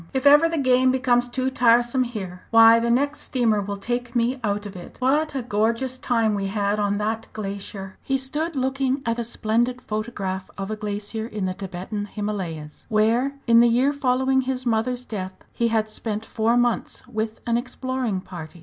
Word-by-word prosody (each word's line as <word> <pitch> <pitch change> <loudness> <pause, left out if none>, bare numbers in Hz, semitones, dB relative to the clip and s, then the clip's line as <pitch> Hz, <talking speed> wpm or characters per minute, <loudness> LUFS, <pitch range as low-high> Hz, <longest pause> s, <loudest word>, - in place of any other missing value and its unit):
"If 265 +1 -1
ever 295 +4 +7
the 330 - -2
game 255 -2 +4
becomes 245 -1 +2
too 260 +1 -1
tiresome 240 +1 +3
here, 190 -6 -6
why, 225 0 +7
the 235 +1 0
next 285 +5 +1
steamer 225 -5 +1
will 200 0 -4
take 240 +3 -3
me 245 +3 +1
out 205 -1 -1
of 205 -1 -8
it! 180 - -10
What 285 +4 +1
a 265 - -2
gorgeous 235 +3 0
time 230 -4 +1
we 200 -1 -1
had 205 +1 0
on 205 0 +1
that 220 +2 -2
glacier!" 195 -2 -6
He 270 - 0
stood 295 +5 -2
looking 265 +1 0
at 230 +1 0
a - - 0
splendid 235 +2 0
photograph 210 -5 -4
of 195 +1 -4
a - - -1
glacier 210 +1 -4
in 210 -4 -3
the 185 - -1
Thibetan 195 +2 -5
Himalayas, 190 -8 -5
where, 230 +6 +2
in 230 -1 +6
the 235 0 +6
year 255 +5 +3
following 265 -1 +2
his 260 0 -3
mother's 245 +2 0
death, 190 -5 -5 0.2
he 235 - +1
had 220 -1 +1
spent 215 0 -4
four 230 +2 +1
months 240 -1 0
with 220 -2 -3
an 235 -1 +1
exploring 250 -4 -2
party. 175 -2 -9
230 Hz, 185 wpm, -23 LUFS, 205-255 Hz, 0.2 s, ever